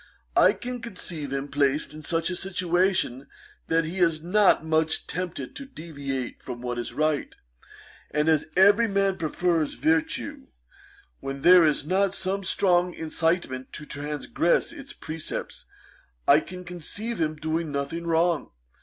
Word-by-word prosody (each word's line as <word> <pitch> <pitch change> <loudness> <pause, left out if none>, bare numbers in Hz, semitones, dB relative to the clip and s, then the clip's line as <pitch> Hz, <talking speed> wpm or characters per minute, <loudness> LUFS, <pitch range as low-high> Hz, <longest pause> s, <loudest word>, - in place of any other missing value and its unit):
I - - +6
can 245 0 -6
conceive 175 - -5
him 135 +1 -2
placed 145 +1 +1
in 155 - -9
such 165 +3 -1
a - - -2
situation 180 -7 0 0.4
that 165 0 +2
he 175 +4 -4
is 165 -3 +2
not 185 -2 +4
much 160 0 +1
tempted 175 -7 -4
to 275 - -7
deviate 140 - -5
from 125 -1 -7
what 120 -1 -3
is 120 - -4
right; 155 -1 0 0.7
and 150 +1 0
as 160 -2 +3
every 205 +5 +6
man 195 -2 +1
prefers 165 0 0
virtue, 160 0 0 0.7
when 135 0 -6
there 180 0 +8
is 150 -2 +2
not 195 +3 +1
some 195 +1 -2
strong 180 -2 +2
incitement 160 -5 -1
to 150 - -6
transgress 150 +4 0
its 275 -1 -9
precepts, 160 0 -6 0.6
I 145 - +7
can 180 +3 -8
conceive 180 +5 -4
him 155 -1 0
doing 160 +1 -2
nothing 145 +4 -3
wrong. 165 0 +2
165 Hz, 145 wpm, -26 LUFS, 150-180 Hz, 0.7 s, there